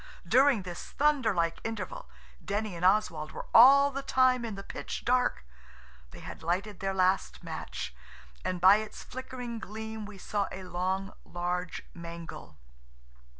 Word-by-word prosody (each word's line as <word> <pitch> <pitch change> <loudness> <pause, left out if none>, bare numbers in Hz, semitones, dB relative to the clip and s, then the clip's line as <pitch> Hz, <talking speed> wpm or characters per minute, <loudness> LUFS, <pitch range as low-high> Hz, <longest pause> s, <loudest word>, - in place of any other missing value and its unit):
During 255 0 +5
this 175 -2 -8
thunder 285 -6 +3
like 170 -2 0
interval - - -5 0.3
Denny 205 -1 -2
and 170 - -6
Oswald 180 -6 +2
were - - -6
all 280 +4 +8
the 275 0 -3
time 255 -2 +3
in 225 -3 -4
the 195 - -7
pitch - - -6
dark. 250 - +2 0.6
They - - -12
had - - -9
lighted 180 +4 -2
their 195 0 -2
last 185 +1 +1
match, - - -5 0.5
and 185 -1 -2
by 190 +3 +8
its 215 0 -6
flickering 250 -2 -6
gleam 220 +1 -6
we 210 -2 -11
saw 200 +1 -1
a 190 - -7
long, 185 +2 -2
large 180 +1 -3
mangle. 170 - -9
200 Hz, 150 wpm, -30 LUFS, 180-240 Hz, 0.6 s, all